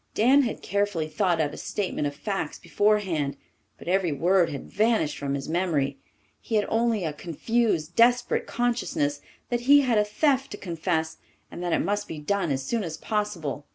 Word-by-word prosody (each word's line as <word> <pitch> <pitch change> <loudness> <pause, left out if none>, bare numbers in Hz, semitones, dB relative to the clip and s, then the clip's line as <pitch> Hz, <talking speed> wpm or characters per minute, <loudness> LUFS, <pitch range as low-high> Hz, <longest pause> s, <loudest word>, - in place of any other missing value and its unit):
Dan 260 +6 +5
had 240 -4 -3
carefully 200 -5 0
thought 175 0 0
out 150 -2 0
a - - -8
statement 185 -7 -2
of 145 - -5
facts 195 +6 -3
beforehand, 190 -9 0 0.4
but - - -13
every 185 -2 +2
word 175 +5 +3
had 140 - -6
vanished 215 -7 +1
from 140 -1 -2
his 135 - -5
memory. 155 -6 0 0.4
He 230 - -4
had 210 - +3
only 225 -3 +1
a 155 - -2
confused, 175 +1 -1
desperate 240 +1 +3
consciousness 230 -12 -1 0.3
that 240 - 0
he 285 0 +9
had 245 -5 +2
a - - +4
theft 270 +5 +1
to - - -6
confess 165 -3 -2 0.3
and - - -7
that 175 -1 -2
it - - +2
must 205 +2 -1
be 160 - -6
done 170 +2 -1
as 135 -1 -1
soon 225 - -1
as 165 -3 -5
possible. 175 - -3
190 Hz, 185 wpm, -26 LUFS, 155-220 Hz, 0.4 s, he